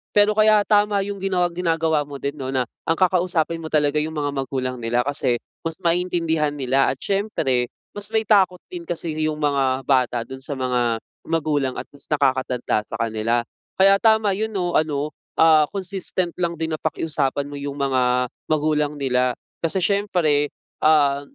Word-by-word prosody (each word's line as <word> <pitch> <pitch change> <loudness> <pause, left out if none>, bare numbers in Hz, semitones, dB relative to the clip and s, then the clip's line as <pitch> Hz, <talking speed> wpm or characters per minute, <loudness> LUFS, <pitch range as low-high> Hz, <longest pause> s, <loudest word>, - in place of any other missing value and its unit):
Pero 205 0 +5
kaya 215 -1 +5
tama 205 -1 +3
yung 205 0 -5
ginaw 185 -2 +1
ginagawa 165 -3 +1
mo 145 -1 -7
din 140 +1 -3
'no 130 -1 -4
na 130 -2 0 0.2
ang 165 - +2
kakausapin 175 -3 +1
mo 160 - -6
talaga 150 -1 +2
yung 160 +1 -4
mga 145 -1 -1
magulang 130 -2 -3
nila 120 +2 +1
kasi 130 -4 0 0.2
mas 165 -1 -4
maintindihan 170 -3 +1
nila 135 -1 +2
at 135 - -2
siyempre, 135 - -1 0.2
mas 205 -1 -3
may 220 0 0
takot 190 -4 +4
din 175 -1 -6
kasi 170 -2 -3
yung 155 -1 0
mga 135 -3 0
bata 125 -3 +2
dun 130 +2 -9
sa 140 +2 -4
mga 125 -3 0 0.3
magulang 150 -5 0
at - - -4
mas 140 - -10
nakakatanda 130 -6 +1
sa - - -6
kanila. 115 +1 0 0.3
Kaya 195 +1 +6
tama 220 -2 +4
'yon 215 +3 -2
'no, 175 -2 -1
ano, 150 -1 0 0.3
ah, 155 -2 +6
consistent 190 -2 -3
lang 170 -1 0
din 160 0 -3
na 155 - -3
pakiusapan 150 -3 -1
mo 145 - -9
'yong 140 0 -5
mga 125 -2 +2 0.2
magulang 150 -1 +1
nila. 125 -2 +1 0.2
Kasi 165 +3 0
siyempre, 170 -7 +1 0.3
ah, 145 -3 +4
150 Hz, 170 wpm, -22 LUFS, 135-180 Hz, 0.3 s, Kaya